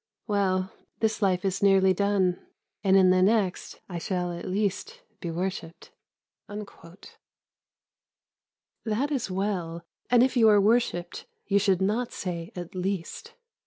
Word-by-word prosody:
Well, 190 -3 0 0.3
this 220 -1 0
life 185 -2 +1
is 190 -1 -1
nearly 195 -1 +5
done, 195 -2 +1 0.4
and 195 -1 +5
in 185 -1 +6
the 185 0 +3
next 195 -2 +1
I 175 -2 -5
shall 180 0 -2
at 170 - -6
least 215 - -2 0.2
be 175 - -5
worshipped." 170 -1 -5 0.6
That 205 -4 -10 2.0
is 265 -8 -1
well, 185 -4 -3 0.3
and 245 -1 +5
if 260 0 +1
you 225 -3 +6
are 205 -1 +6
worshipped 200 -5 0 0.2
you 200 0 +2
should 190 -2 +2
not 225 +5 0
say 170 -2 -5
"at 175 -2 -7
least." 185 -1 -4
190 Hz, 130 wpm, -27 LUFS, 180-205 Hz, 2.0 s, in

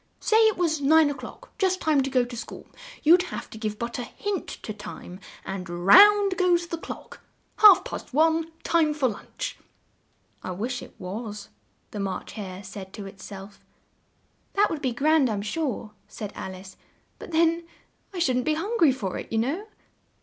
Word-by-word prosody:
Say 440 - +2
it 435 - +1
was 320 -4 0
nine 305 +1 +5
o'clock, - - -10
just 375 -1 +2
time 305 -5 +2
to 270 - -2
go 255 -2 +2
to 240 0 -8
school; 235 - -8 0.4
you'd 345 +4 +7
have 360 - -5
but - - -20
to - - -9
give 215 -1 -3
a 235 +1 -3
hint 390 +9 -4
to 215 - -7
Time, 195 -3 -9 0.3
and 190 -2 -5
round 390 - +6
goes 350 -2 +3
the 335 -1 -5
clock! - - -9 0.4
Half 420 -4 +8
past - - -7
one, 320 +3 +2
time 315 -3 +2
for 280 -4 +2
lunch." 215 - -6 0.8
"I 185 - -5
wish 240 +7 -3
it - - -12
was," 205 +2 -6 0.4
the 210 - -6
March 195 -2 -4
Hare 195 -3 -7
said 190 -1 -9
to 205 - -7
it 195 0 -11
self. 200 0 -10 0.9
"That 410 +1 +3
would 315 -3 -3
be 260 -3 0
grand, 285 +2 +3
I'm 205 -2 -2
sure," 235 -2 -3 0.2
said 210 -2 -7
Al 190 - -6
ice: 185 +1 -12 0.4
"but - - -9
then 335 +1 +2 0.4
I 380 - -8
shouldn't 255 -8 +1
be 310 - +2
hun 400 +9 -3
gry 320 -5 +6
for 205 -8 -4
it, - - -9
you 225 - 0
know." 295 - -1
265 Hz, 185 wpm, -26 LUFS, 205-335 Hz, 0.9 s, Half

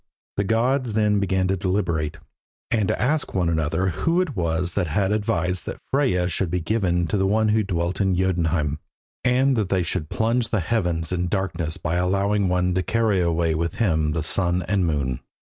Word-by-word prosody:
The 100 - +2
gods 120 +3 +1
then 105 -1 +2
began 95 -1 +1
to 95 - +2
deliberate, 85 -5 -1 0.5
and 110 -4 +2
to - - -1
ask 150 0 0
one 90 -3 +1
another 80 +3 0
who 165 - 0
it 175 -8 -1
was 85 -1 -1
that 95 -4 0
had 95 +5 0
advised 90 -4 -1
that - - -4
Freyja 125 -11 +2
should 90 0 -1
be 90 +2 -1
given 90 -1 0
to 95 +4 0
one 110 +3 +2
who 110 +1 +3
dwelt 90 -1 -2
in 95 -2 +2
Jotunheim, 85 -5 0 0.4
and 130 +2 +3
that 105 -5 -1
they 95 -2 +1
should 85 -2 -3
plunge 115 +1 0
the 110 - +1
heavens 85 -4 -1
in 90 -1 -1
darkness 85 -4 -2
by 85 0 -2
allowing 100 +2 +1
one 90 0 +1
to 95 - +1
carry 105 0 +1
away 85 -1 +1
with 85 +1 -2
him 80 -8 +1
the 80 -1 -1
sun 90 +2 +1
and 95 -1 0
moon. 70 -5 -1
90 Hz, 190 wpm, -23 LUFS, 85-105 Hz, 0.5 s, who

